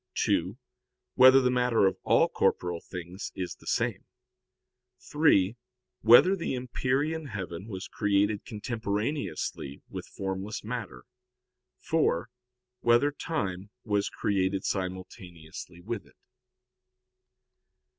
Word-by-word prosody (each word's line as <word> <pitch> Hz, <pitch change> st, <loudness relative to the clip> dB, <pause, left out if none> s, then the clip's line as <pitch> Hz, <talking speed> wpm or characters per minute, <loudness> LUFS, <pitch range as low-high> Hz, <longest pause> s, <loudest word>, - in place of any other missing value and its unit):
(2) 95 Hz, 0 st, +1 dB, 0.6 s
Whether 130 Hz, +1 st, +8 dB
the 125 Hz, -1 st, +2 dB
matter 125 Hz, -4 st, +3 dB
of 95 Hz, -, +2 dB
all -, -, +4 dB
corporeal 85 Hz, -1 st, 0 dB
things 90 Hz, +1 st, -7 dB
is 90 Hz, -2 st, -4 dB
the -, -, -16 dB
same? -, -, 0 dB, 1.0 s
(3) 120 Hz, -, +3 dB, 0.5 s
Whether 120 Hz, -, +7 dB
the 170 Hz, -7 st, -2 dB
empyrean 135 Hz, +5 st, -1 dB
heaven 95 Hz, -4 st, -6 dB
was 100 Hz, 0 st, -6 dB
created 105 Hz, -1 st, +1 dB
contemporaneously 110 Hz, -, -3 dB
with -, -, -7 dB
formless 95 Hz, +2 st, -4 dB
matter? 105 Hz, -, -5 dB, 0.7 s
(4) 85 Hz, +6 st, 0 dB, 0.5 s
Whether 120 Hz, +5 st, +4 dB
time 100 Hz, -, -3 dB
was 105 Hz, -2 st, 0 dB
created 95 Hz, -1 st, 0 dB
simultaneously 90 Hz, -3 st, -6 dB
with 110 Hz, +3 st, -5 dB
it? -, -, -24 dB
105 Hz, 100 wpm, -28 LUFS, 95-125 Hz, 1.0 s, Whether